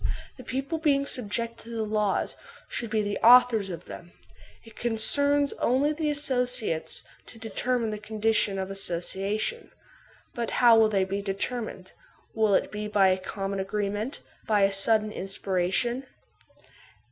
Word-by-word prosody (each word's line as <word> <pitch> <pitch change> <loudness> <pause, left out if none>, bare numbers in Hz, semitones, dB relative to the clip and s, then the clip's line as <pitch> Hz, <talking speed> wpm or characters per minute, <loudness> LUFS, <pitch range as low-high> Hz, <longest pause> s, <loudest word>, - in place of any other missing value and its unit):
The 255 - -10
people, 270 +6 -3
being 280 -3 +2
subjected 230 -2 -3
to 235 0 -8
the 225 - -1
laws, 210 -2 -1 0.3
should 235 - -4
be 215 0 0
the 205 0 -3
authors 235 -4 +6
of 175 -1 -7
them; 175 0 -11 0.5
it 225 -2 -16
concerns 285 +5 +2
only 275 +5 +2
the 305 0 -1
associates 250 - -1 0.2
to 230 - -10
determine 225 +1 -1
the 210 - -5
conditions 215 -1 +1
of 190 0 -4
association. 195 - -2 0.6
But 235 -1 -3
how 240 -2 +7
will 220 -1 +5
they 195 -3 +2
be 195 +2 -3
determined? 200 -1 -4 0.4
Will 215 -3 +3
it - - 0
be 210 0 -4
by 200 -2 +4
a 185 - +2
common 195 +1 -4
agreement, 205 +4 -3 0.3
by 210 -2 +3
a 195 0 +4
sudden 215 +2 +3
inspiration 195 +7 -1
220 Hz, 145 wpm, -27 LUFS, 195-245 Hz, 0.6 s, how